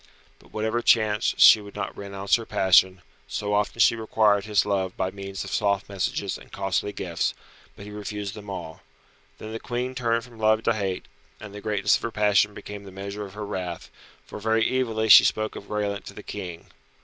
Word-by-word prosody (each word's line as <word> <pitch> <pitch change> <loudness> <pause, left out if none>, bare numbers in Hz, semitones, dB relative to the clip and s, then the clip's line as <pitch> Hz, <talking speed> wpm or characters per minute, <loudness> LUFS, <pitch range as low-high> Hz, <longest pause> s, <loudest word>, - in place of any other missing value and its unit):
But - - -21
whatever 110 +2 -1
chanced 110 -2 +2
she 110 - +9
would 100 -1 -12
not - - -4
renounce 100 0 0
her 115 - -8
passion, 95 -1 +3 0.2
so 105 0 -3
often 105 +3 0
she 115 - +5
required 105 -2 +2
his 105 -2 +2
love 95 -2 -1
by 95 0 -1
means 100 0 -6
of 100 - -8
soft 100 -2 0
messages 100 0 -3
and - - -17
costly 95 +1 -1
gifts, 85 -4 -2 0.4
but 100 - -11
he 105 - -9
refused 105 -1 -5
them 105 -1 -10
all. 85 -4 -7 0.6
Then 110 - -8
the 115 - -5
Queen 125 +2 -3
turned 115 -2 0
from 120 -2 -15
love 110 0 +3
to 115 - +2
hate, 100 -4 -3 0.3
and 105 - -10
the 105 - -8
greatness 105 -1 +2
of - - -15
her 115 - -2
passion 105 -1 +2
became 105 0 -8
the 95 - -11
measure 100 +2 -6
of 95 - -15
her 105 0 -5
wrath, 90 -4 -5 0.3
for - - -9
very 110 +1 +2
evilly 110 -3 -1
she 105 - +10
spoke 110 0 0
of 100 - -9
Graelent 105 -1 -3
to - - -10
the - - -9
King. 85 -2 -8
105 Hz, 205 wpm, -25 LUFS, 100-110 Hz, 0.6 s, she